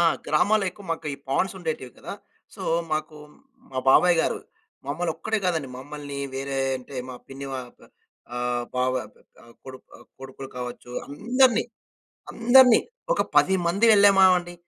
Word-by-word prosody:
ఆ! - - +5 0.2
గ్రామాల్లో 200 +7 +2
ఎక్కువ 200 +1 -15
మాకు 160 -2 -5 0.2
పాండ్స్ 190 +8 0
ఉండేటివి 155 -8 -5
కదా. - - -8 0.4
సో, - - -9 0.3
మాకు 155 0 -3 0.6
మా 130 - -3
బాబాయ్ 175 +5 +5
గారు - - -1 0.5
మమ్మల్ని 160 +4 -2
ఒక్కడే 220 +7 -1
కాదండి, 160 -6 -1
మమ్మల్ని 145 +1 -8 0.2
వేరే 135 0 -3 0.2
అంటే 130 +2 -13 0.2
మా 125 - -8
పిన్ని 135 +1 -8
వాళ్ల 125 -2 -9 0.5
ఆహ్, 120 0 -1
బావ 125 0 +1 0.5
ఆహ్, 115 0 -18
కొడుకు, 130 -1 -11
ఆహ్, 120 - -17
కొడుకులు 135 0 -9
కావచ్చు 125 0 -7 0.2
అందరిని 240 - +2 0.7
అందరిని 245 +1 +6 0.3
ఒక - - +1
10 190 - +5
మంది 200 +7 +2
వెళ్ళామా 200 -2 +6
అండి. 175 0 -6
150 Hz, 145 wpm, -25 LUFS, 130-195 Hz, 0.7 s, అందరిని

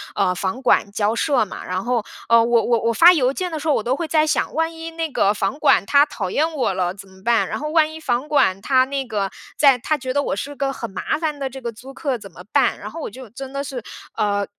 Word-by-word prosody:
呃， 180 -2 +1
房 195 +8 -3
管 220 -5 +2
交 210 +2 0
涉 255 -4 +2
嘛。 - - -8
然 185 +1 -2
后， 240 -3 0 0.2
呃， 230 0 +6
我 235 0 +3
我 235 -1 +2
我 230 - +1
发 345 +9 +8
邮 265 -6 +2
件 360 +5 -3
的 320 - -4
时 305 - -5
候， 295 - +5
我 - - +1
都 255 +2 0
会 335 - -3
在 310 -1 +2
想， - - 0
万 325 +1 0
一 325 0 -7
那 325 -1 -3
个 200 -6 +2
房 200 +6 -2
管， 275 -9 +4
他 285 +5 +5
讨 185 - -4
厌 315 - +1
我 255 -9 0
了 180 -1 -1
怎 195 0 -12
么 190 0 -18
办？ 235 0 +2
然 - - -3
后 300 +1 -4
万 310 -1 +3
一 320 - -8
房 255 +1 -1
管 265 -11 +2
他 255 +2 +3
那 275 0 -3
个 205 -4 -2 0.3
在 275 -4 +6
他 305 +5 -1
觉 255 -2 -4
得 285 - +2
我 - - -2
是 285 +8 -5
个 275 -1 -1
很 230 - -6
麻 190 - -2
烦 310 -2 -2
的 270 -1 -2
这 265 +1 -9
个 235 -1 -4
租 255 +5 -12
客， 270 -3 -2
怎 - - -11
么 - - -13
办？ - - +2
然 - - -7
后 330 - -7
我 - - -4
就 255 +1 -11
真 270 +3 -9
的 275 0 -2
是 265 -3 -5 0.3
呃， 205 -2 0
260 Hz, 295 characters per minute, -21 LUFS, 215-295 Hz, 0.3 s, 发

